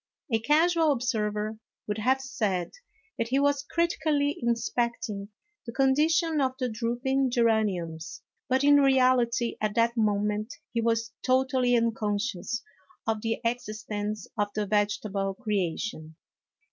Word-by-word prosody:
A 225 Hz, -, +3 dB
casual 320 Hz, +5 st, +3 dB
observer 215 Hz, -4 st, -1 dB, 0.3 s
would 210 Hz, +1 st, -2 dB
have 260 Hz, +5 st, +2 dB
said 200 Hz, -9 st, -2 dB, 0.5 s
that 230 Hz, -, 0 dB
he 260 Hz, +3 st, +1 dB
was 285 Hz, -1 st, +2 dB
critically 300 Hz, -2 st, 0 dB
inspecting 235 Hz, -3 st, -1 dB, 0.4 s
the -, -, -4 dB
condition 300 Hz, +5 st, +2 dB
of 260 Hz, -1 st, +1 dB
the 255 Hz, -2 st, -1 dB
drooping 245 Hz, +4 st, 0 dB
geraniums, 200 Hz, -9 st, 0 dB, 0.3 s
but, 260 Hz, +1 st, +2 dB
in 285 Hz, 0 st, +7 dB
reality, 255 Hz, -3 st, +3 dB
at 215 Hz, -1 st, -1 dB
that 235 Hz, +1 st, +2 dB
moment 210 Hz, 0 st, 0 dB, 0.2 s
he 230 Hz, -, +1 dB
was 230 Hz, 0 st, 0 dB
totally 255 Hz, -1 st, +2 dB
uncon 225 Hz, -3 st, +1 dB
scious 235 Hz, +2 st, -3 dB, 0.4 s
of 220 Hz, -1 st, -1 dB
the 225 Hz, 0 st, -2 dB
existence 215 Hz, -3 st, -3 dB
of 205 Hz, -, +2 dB
the 210 Hz, -1 st, 0 dB
vegetable 200 Hz, -1 st, 0 dB
creation. 190 Hz, -7 st, -3 dB
230 Hz, 125 wpm, -27 LUFS, 210-265 Hz, 0.5 s, in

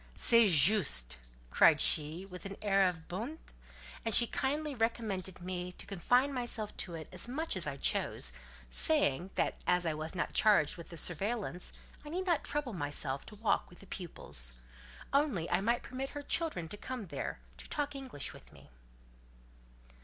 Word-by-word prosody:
"C'est 230 Hz, -2 st, +7 dB
juste," 145 Hz, -, +4 dB, 0.3 s
cried -, -, +6 dB
she 155 Hz, +5 st, +4 dB
with 180 Hz, -2 st, -10 dB
an 195 Hz, -, -8 dB
air 195 Hz, -2 st, +4 dB
of 160 Hz, -2 st, -8 dB
bonté; 230 Hz, -, -4 dB, 0.7 s
and 225 Hz, -2 st, +3 dB
she 240 Hz, -, +9 dB
kindly 290 Hz, +5 st, -2 dB
recommended 220 Hz, -6 st, -2 dB
me 180 Hz, 0 st, -4 dB
to -, -, -8 dB
confine 245 Hz, +9 st, +2 dB
myself 240 Hz, -4 st, -3 dB
to 170 Hz, -, -3 dB
it 155 Hz, -2 st, -7 dB
as 180 Hz, +4 st, -1 dB
much 305 Hz, +4 st, -2 dB
as 180 Hz, -5 st, -2 dB
I 140 Hz, -1 st, -4 dB
chose, -, -, 0 dB, 0.4 s
saying, 135 Hz, -, +3 dB
that -, -, 0 dB
as 180 Hz, 0 st, +3 dB
I 160 Hz, -, +1 dB
was 155 Hz, +3 st, -4 dB
not 175 Hz, -, -2 dB
charged 205 Hz, -9 st, +4 dB
with 170 Hz, -, -10 dB
the 170 Hz, -, -9 dB
surveillance, 190 Hz, +2 st, -2 dB, 0.3 s
I 295 Hz, -, -9 dB
need 365 Hz, +4 st, -2 dB
not 345 Hz, -4 st, +1 dB
trouble 290 Hz, -5 st, -3 dB
myself 145 Hz, -4 st, -3 dB
to 210 Hz, -, -10 dB
walk 210 Hz, -1 st, 0 dB
with 175 Hz, -, -16 dB
the -, -, -13 dB
pupils: 65 Hz, -, -4 dB, 0.6 s
only 275 Hz, -, +2 dB
I -, -, +2 dB
might 235 Hz, +4 st, +1 dB
permit 265 Hz, +2 st, -5 dB
her 290 Hz, -, -5 dB
children 320 Hz, -, -1 dB
to 205 Hz, -, -6 dB
come 250 Hz, -1 st, -5 dB
there, 145 Hz, -6 st, -4 dB, 0.2 s
to -, -, -11 dB
talk 290 Hz, -1 st, -2 dB
English 265 Hz, -, -6 dB
with -, -, -14 dB
me. -, -, -17 dB
195 Hz, 175 wpm, -33 LUFS, 165-245 Hz, 0.7 s, she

